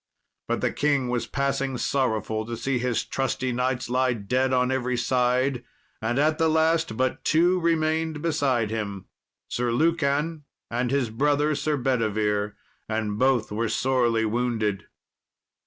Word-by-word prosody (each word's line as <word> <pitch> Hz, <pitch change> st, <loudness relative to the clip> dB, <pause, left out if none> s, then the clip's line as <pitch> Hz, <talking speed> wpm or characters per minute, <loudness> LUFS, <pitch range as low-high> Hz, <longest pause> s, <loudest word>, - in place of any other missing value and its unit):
But -, -, -1 dB
the -, -, +1 dB
king 140 Hz, -4 st, +1 dB
was 120 Hz, -1 st, -1 dB
passing 135 Hz, -1 st, -1 dB
sorrowful 110 Hz, -5 st, 0 dB
to 120 Hz, -1 st, -4 dB
see 135 Hz, +1 st, -1 dB
his 125 Hz, -2 st, -1 dB
trusty 130 Hz, -1 st, -1 dB
knights 125 Hz, +1 st, -1 dB
lie 130 Hz, +1 st, +2 dB
dead 125 Hz, +5 st, 0 dB
on 125 Hz, 0 st, +2 dB
every 125 Hz, -1 st, -1 dB
side. 125 Hz, +1 st, +1 dB, 0.4 s
And 115 Hz, +3 st, -1 dB
at 155 Hz, +2 st, +2 dB
the 160 Hz, 0 st, +3 dB
last 160 Hz, -6 st, +2 dB
but 130 Hz, 0 st, -1 dB
two 175 Hz, +3 st, +3 dB
remained 160 Hz, -2 st, 0 dB
beside 140 Hz, -8 st, 0 dB
him, 100 Hz, -4 st, -4 dB, 0.4 s
Sir 120 Hz, 0 st, -1 dB
Lucan, 150 Hz, +2 st, +1 dB, 0.3 s
and 120 Hz, +1 st, 0 dB
his 130 Hz, -4 st, 0 dB
brother, 145 Hz, +5 st, +2 dB
Sir 150 Hz, +1 st, -1 dB
Bedivere, 105 Hz, -5 st, 0 dB, 0.3 s
and 110 Hz, -1 st, -2 dB
both 130 Hz, -4 st, +2 dB
were 110 Hz, +2 st, -1 dB
sorely 120 Hz, -2 st, +1 dB
wounded. 110 Hz, -3 st, -1 dB
125 Hz, 140 wpm, -25 LUFS, 115-145 Hz, 0.4 s, the